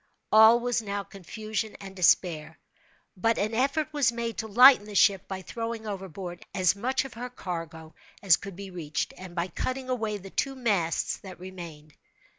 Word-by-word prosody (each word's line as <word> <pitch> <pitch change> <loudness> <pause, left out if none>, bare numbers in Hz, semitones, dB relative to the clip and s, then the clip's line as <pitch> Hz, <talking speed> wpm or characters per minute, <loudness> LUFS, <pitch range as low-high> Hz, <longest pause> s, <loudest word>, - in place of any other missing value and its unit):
All 220 +2 +8
was 245 -1 0
now 200 -1 -3
confusion 215 +3 -5
and 195 -1 -10
despair—but 180 +4 -1
an 215 +3 -1
effort 280 +6 0
was 280 -5 +3
made 235 -1 -4
to 220 - -3
lighten 245 +1 +7
the 210 - -8
ship 195 -1 +4
by 190 -1 -6
throwing 230 +2 -5
overboard 190 -3 -6
as 185 -1 +3
much 255 +6 -1
of 270 - -9
her 245 +2 -6
cargo 165 -7 -7 0.3
as 185 -5 +6
could 195 -2 -9
be 195 0 -8
reached, 160 -4 -3
and 185 -1 -10
by 170 +1 -1
cutting 255 +8 -4
away 220 -4 -1
the 195 -1 -11
two 270 0 -1
masts 200 -10 0
that 185 -3 -11
remained. 170 -5 -10
200 Hz, 170 wpm, -27 LUFS, 180-230 Hz, 0.3 s, All